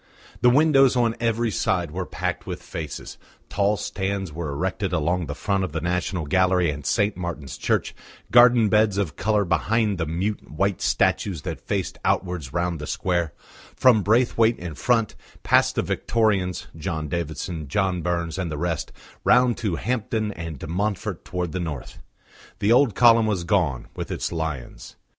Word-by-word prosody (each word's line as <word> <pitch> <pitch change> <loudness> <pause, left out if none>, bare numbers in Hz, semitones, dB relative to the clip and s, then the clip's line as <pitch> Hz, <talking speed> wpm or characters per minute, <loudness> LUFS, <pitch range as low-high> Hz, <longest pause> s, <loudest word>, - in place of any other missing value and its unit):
The 125 - +6
windows 135 -1 +5
on 120 -2 +2
every 115 0 0
side 90 -5 0
were 90 +2 -4
packed - - -3
with - - -5
faces; 75 -4 -7 0.3
tall 100 +1 +1
stands 95 -4 -3
were 80 -1 -4
erected 95 +6 -2
along 85 +1 0
the 70 - -5
front 100 +3 0
of 90 - -4
the 80 - -1
National 90 0 -2
Gallery 90 0 +2
and 75 0 -7
St. 100 - +1
Martin's 85 -6 -5
Church, - - -1 0.4
garden 120 -2 +7
beds 105 0 +3
of 90 -8 -1
colour 105 +2 +1
behind 100 +4 +1
the 80 - -1
mute, 95 +6 -3
white 95 +5 -1
statues 90 -8 +1
that - - -5
faced - - -3
outwards 90 -7 -1
round 85 -1 -1
the 75 - -6
square; 85 -4 -1 0.4
from 125 -5 +5
Braithwaite 115 +2 +3
in 85 -2 -6
front, 115 - +1 0.3
past - - +3
the - - +1
Victorians 100 -6 0
John 80 -1 -3
Davidson, 80 0 -4
John 95 +3 0
Burns, 85 0 -2
and 90 -3 -2
the 75 - -3
rest 85 0 -2 0.3
round 125 -1 +4
to 105 -8 -1
Hampden 110 0 -2
and 85 -4 -6
de - - -7
Montfort 100 +3 -2
towards 90 -3 -4
the 90 - -2
north. 80 -7 -6 0.6
The 105 - +1
old 125 -4 +4
column 115 -2 +6
was 95 -5 -1
gone, 85 -8 0
with - - -5
its - - -3
lions. 80 -6 -5
90 Hz, 165 wpm, -24 LUFS, 80-110 Hz, 0.6 s, garden